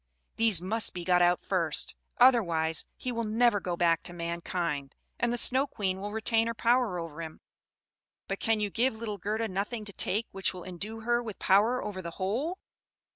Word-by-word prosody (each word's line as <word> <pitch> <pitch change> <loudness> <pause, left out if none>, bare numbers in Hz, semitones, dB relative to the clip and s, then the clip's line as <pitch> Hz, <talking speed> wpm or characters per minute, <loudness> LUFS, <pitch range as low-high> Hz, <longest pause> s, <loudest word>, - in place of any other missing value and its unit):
These 220 -7 +4
must 220 +3 0
be 175 - -4
got 180 0 +4
out 175 0 +4
first; 170 -5 -1 0.2
otherwise 170 -11 +4
he 255 - -4
will 230 -1 -2
never 225 0 +3
go 180 -2 -3
back 165 -2 +3
to 175 - -7
mankind, 170 -4 -3 0.2
and 240 - +1
the 240 - -1
Snow 260 +4 +3
Queen 190 -6 -2
will 205 +1 -4
retain 225 +1 +1
her 230 - -2
power 235 -5 +2
over 165 -2 -6
him." 160 -1 -8 0.9
"But - - -3
can 225 -1 +2
you 205 -1 -1
give 240 +2 +2
little 220 -2 -5
Gerda 220 +4 -1
nothing 210 +3 -3
to 200 - -6
take 215 +5 0
which 195 -1 -1
will 180 - -8
endue 205 +5 -6
her 240 +1 +1
with 220 -4 -7
power 220 +6 +3
over 200 -3 -5
the 170 - -5
whole?" 245 - -1
205 Hz, 190 wpm, -29 LUFS, 175-230 Hz, 0.9 s, These